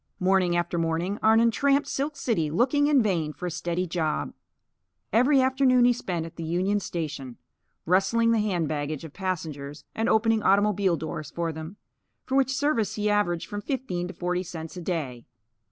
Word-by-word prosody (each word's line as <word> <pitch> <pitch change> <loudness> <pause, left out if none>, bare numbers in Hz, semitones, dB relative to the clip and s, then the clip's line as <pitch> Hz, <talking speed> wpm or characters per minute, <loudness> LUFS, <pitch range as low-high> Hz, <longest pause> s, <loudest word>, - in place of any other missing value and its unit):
Morning 185 -1 +2
after 175 0 -1
morning, 165 +5 -1
Arnon 225 +1 +5
tramped 280 +4 +2
Silk 290 +2 -2
City, 215 - 0
looking 260 - +2
in 285 -5 +4
vain 165 -7 0
for 180 - -7
a 175 - -2
steady 175 +2 -2
job. 160 -3 -2 0.8
Every 260 +5 +5
afternoon 260 -1 +4
he 245 - +5
spent 175 -8 -3
at 165 - -11
the 165 - -5
Union 185 +5 0
Station, 150 -9 -5 0.5
rustling 195 +6 +3
the 230 - +3
hand 185 -7 0
baggage 150 0 -3
of 160 -3 -9
passengers 155 -6 -4
and 225 - 0
opening 225 0 +3
automobile 200 -3 +3
doors 155 -1 -5
for 170 -1 -2
them; 160 +5 -8 0.5
for 265 - -2
which 270 -1 +3
service 270 -6 0
he 210 0 0
averaged 175 -5 +1
from 205 0 -5
fifteen 230 -10 -3
to 185 - -8
forty 180 0 -1
cents 165 -2 -7
a 180 - -6
day. 150 -9 -4
185 Hz, 175 wpm, -26 LUFS, 165-225 Hz, 0.8 s, Arnon